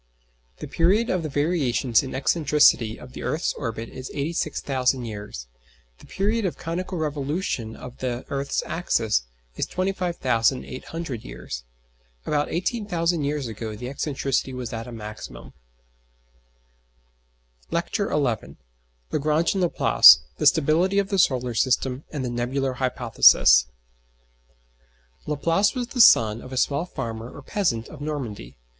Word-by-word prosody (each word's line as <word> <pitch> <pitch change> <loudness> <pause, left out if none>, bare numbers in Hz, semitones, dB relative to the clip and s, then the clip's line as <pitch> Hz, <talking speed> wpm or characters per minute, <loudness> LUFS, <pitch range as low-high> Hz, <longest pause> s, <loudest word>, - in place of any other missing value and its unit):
The - - -7
period 195 +8 +2
of 185 - 0
the 155 - -4
variations 140 -5 +1
in 135 - -7
excentricity 135 -4 +3
of 125 +1 -12
the - - -8
earth's 160 +3 -1
orbit 115 -3 -5
is 130 0 -8
86,000 140 -4 -1
years; 105 - -7 0.5
the - - -16
period 215 +4 -1
of 185 - -2
conical 180 +2 -4
revolution 145 - -3
of 125 0 -11
the 125 -1 -3
earth's 140 0 -2
axis 110 - 0 0.3
is - - -1
25,800 150 - -2
years. - - -8 0.6
About 150 -1 0
18,000 175 -4 -1
years 145 -1 -2
ago 110 -1 -6
the 125 +4 -6
excentricity 135 -2 -2
was 125 -3 -5
at 115 +1 -5
a - - -8
maximum. 105 -2 -9 2.2
LECTURE 170 +4 -1
XI - - -1 1.0
LAGRANGE 155 +3 +1
AND 195 - -1
LAPLACE - - +7 0.2
THE - - +3
STABILITY 175 +7 +3
OF 200 -1 +1
THE 195 -2 0
SOLAR 125 -7 +2
SYSTEM, 130 +3 0
AND 140 -4 -4
THE 120 - -3
NEBULAR 130 +3 -1
HYPOTHESIS 120 - +5 1.6
Laplace 165 - +1
was 245 -1 -3
the 250 -3 +2
son 115 - +6
of 130 - -11
a 130 - -5
small 145 +6 0
farmer 115 -5 -5
or 145 - -12
peasant 135 - -1
of 150 - -11
Normandy. 115 - -5
140 Hz, 130 wpm, -24 LUFS, 120-170 Hz, 2.2 s, LAPLACE